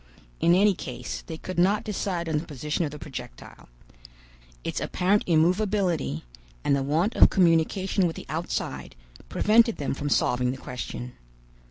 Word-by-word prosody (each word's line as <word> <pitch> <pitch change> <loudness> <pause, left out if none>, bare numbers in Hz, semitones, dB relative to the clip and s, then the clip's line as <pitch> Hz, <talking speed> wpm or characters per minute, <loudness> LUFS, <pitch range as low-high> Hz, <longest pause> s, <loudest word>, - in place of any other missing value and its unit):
In 170 - +4
any 200 +2 +5
case - - -6
they 160 - -6
could 185 +2 -5
not 200 +4 +3
decide 185 -4 -2
on 155 -2 +1
the 165 - -8
position 150 +3 -2
of 155 - -1
the 150 - -9
projectile. 130 - -10 0.9
Its - - -2
apparent 195 +3 +1
immovability, 180 - +1 0.4
and 140 - +3
the 140 - 0
want 160 - 0
of - - +7
communication 185 +2 +2
with 165 - -4
the - - -8
outside, 165 - -4 0.3
prevented 230 +1 +4
them 140 - -2
from 145 +2 -3
solving 125 -2 +2
the 130 - -3
question. 125 -1 -6
165 Hz, 155 wpm, -26 LUFS, 145-190 Hz, 0.9 s, of